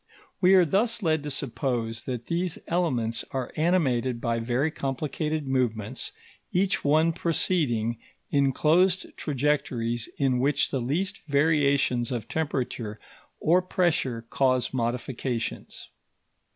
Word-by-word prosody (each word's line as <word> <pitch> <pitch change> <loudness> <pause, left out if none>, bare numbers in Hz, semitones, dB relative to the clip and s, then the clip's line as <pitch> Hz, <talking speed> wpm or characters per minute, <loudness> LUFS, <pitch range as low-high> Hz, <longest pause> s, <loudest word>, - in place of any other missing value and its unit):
We 185 +1 +6
are 185 -2 +6
thus 210 +6 +1
led 160 -2 +2
to 150 - -5
suppose 120 -4 -2
that 125 -3 -4
these 175 0 -1
elements 130 -10 0
are 130 -2 -3
animated 135 -8 +1
by 115 -1 -1
very 125 +7 0
complicated 150 +2 -2
movements, 125 -3 -1 0.4
each 190 +2 +1
one 155 +3 +3
proceeding 125 -10 0 0.3
in 140 -1 +3
closed 180 +7 +2
trajectories 125 -5 -1
in 130 -3 +2
which 140 +2 +2
the 135 - -1
least 175 +11 -1
variations 140 -5 +2
of 115 -4 -3
temperature 125 -8 -3 0.4
or 175 +4 +4
pressure 160 - 0
cause 130 -2 +2
modifications. 120 0 -3
135 Hz, 115 wpm, -26 LUFS, 120-160 Hz, 0.4 s, We